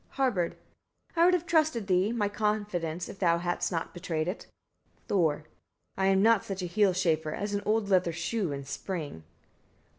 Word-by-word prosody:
Harbard. 225 -11 +1 0.6
34. 330 - -1
I - - +7
would 365 - +5
have 350 -1 -2
trusted 310 -10 +2
thee, 190 +2 +2
my 225 -3 0
confidence 200 -5 -2
if 195 - -10
thou 170 -3 +3
hadst 175 +2 -1
not 165 -2 -3
betrayed 165 -3 -2
it. 185 - -4 0.6
Thor. 160 -6 +2 0.6
35. 190 - 0
I - - +4
am 195 0 +4
not 225 -2 +5
such 195 -2 -5
a - - -1
heel 190 +1 +2
chafer 160 -4 0
as 205 0 -3
an 205 - 0
old 215 -1 +2
leather 180 -3 +3
shoe 175 +2 -2
in 140 0 -4
spring. 150 - -5
190 Hz, 185 wpm, -29 LUFS, 170-210 Hz, 0.6 s, I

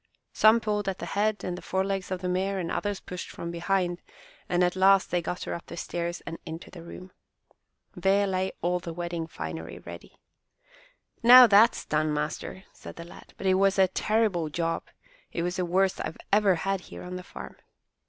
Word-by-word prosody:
Some 220 +2 +6
pulled 210 -2 -1
at 190 - -4
the - - -6
head 210 +1 0
and 180 - -3
the 180 - -8
forelegs 190 0 -2
of 185 -1 -3
the 185 - -2
mare 190 +2 0
and 175 -3 -3
others 205 -2 -2
pushed 180 -1 -7
from 170 - -6
behind, 175 0 -1 0.5
and 175 0 +2
at 180 0 +1
last 195 +1 +4
they 175 - +1
got 180 +2 -4
her - - -4
up 170 - -7
the - - -8
stairs 170 +1 -3
and 165 -1 -6
into 165 0 -8
the 175 - -10
room. 180 +2 -10 0.8
There 200 +1 +2
lay 190 -1 -1
all 180 +1 +1
the 170 -1 -7
wedding 170 -1 -4
finery 80 - -6
ready. 85 0 -11 1.0
"Now 250 +2 +10
that's 220 +1 +5
done, 155 0 0
master!" 150 +5 -4
said - - -11
the 170 - -8
lad; 175 - -14
"but - - -7
it 190 - +4
was 195 +1 +3
a 190 -1 +5
terrible 210 -6 +1
job. 165 +1 -2 0.4
It 170 - -2
was 175 +2 -2
the 180 - 0
worst 190 +2 +1
I - - -2
have - - -9 0.2
ever 205 -3 +5
had 195 +2 -1
here - - -10
on 180 0 -6
the 180 - -5
farm." - - -10
180 Hz, 200 wpm, -27 LUFS, 170-195 Hz, 1.0 s, Now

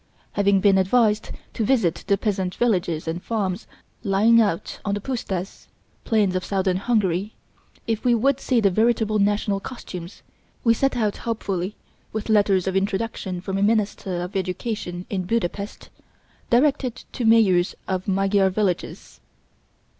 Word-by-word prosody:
Having 200 -1 +2
been 195 -1 +5
advised 210 +2 +2 0.2
to 225 - -1
visit 225 -9 +1
the 200 - +3
peasant 190 -3 -1
villages 175 -9 0
and 165 +2 -3
farms 200 -3 -2 0.4
lying 220 +3 +4
out 200 -6 -1
on 200 -1 -1
the - - -3
püstas 200 -6 -4 0.4
(plains 210 -5 +2
of 185 - -1
southern 190 -2 0
Hungary) 200 -2 0 0.5
if 225 -2 -2
we 245 -1 +4
would 270 +4 +2
see 255 -3 +1
the 200 -3 +3
veritable 220 +1 +2
national 205 0 +1
costumes, 185 -6 -8 0.4
we 230 - +5
set 270 +2 0
out 215 -3 0
hopefully 200 -4 -3 0.4
with 220 0 -4
letters 200 -4 +3
of 190 0 -1
introduction 195 -2 -2
from 195 +1 -3
a - - 0
minister 200 -4 0
of 180 +2 -7
education 185 -1 -3
in 190 -3 -2
Buda 215 -2 +1
Pest, 200 +2 -8 0.6
directed 255 -1 +2
to 250 - -4
mayors 210 -6 +4
of 185 +1 -2
Magyar 195 0 +2
villages. 190 -2 -3
200 Hz, 145 wpm, -23 LUFS, 185-225 Hz, 0.6 s, been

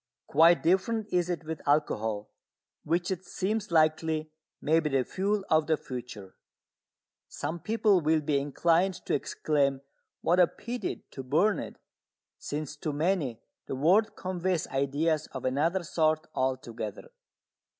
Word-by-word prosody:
Quite 165 +4 +5
different 195 +6 +2
is 180 -1 +2
it 175 -2 -2
with 160 0 -5
alcohol, 110 -8 0 0.5
which 175 +4 0
it 185 -1 -3
seems 210 +4 -2
likely 155 -1 +2 0.3
may 160 +2 +3
be 155 -2 -1
the 135 -2 +2
fuel 200 +1 -1
of 155 -1 +3
the 160 -1 +2
future. 120 -8 -8 0.9
Some 170 - -4
people 215 -2 +2
will 155 0 +2
be 145 -1 +1
inclined 170 +6 +2
to - - -1
exclaim 140 -1 0 0.4
"What 175 +2 +2
a 180 - +7
pity 240 +6 -5
to 135 - -6
burn 160 +11 +2
it!" - - -7 0.6
since 150 0 -4
to 150 - -3
many 145 - 0 0.3
the - - -3
word 185 +11 +3
conveys 185 -2 -1
ideas 145 +3 0
of 130 -2 -5
another 160 +8 +1
sort 155 -1 +1
altogether. 120 -5 -3
160 Hz, 140 wpm, -29 LUFS, 140-180 Hz, 0.9 s, a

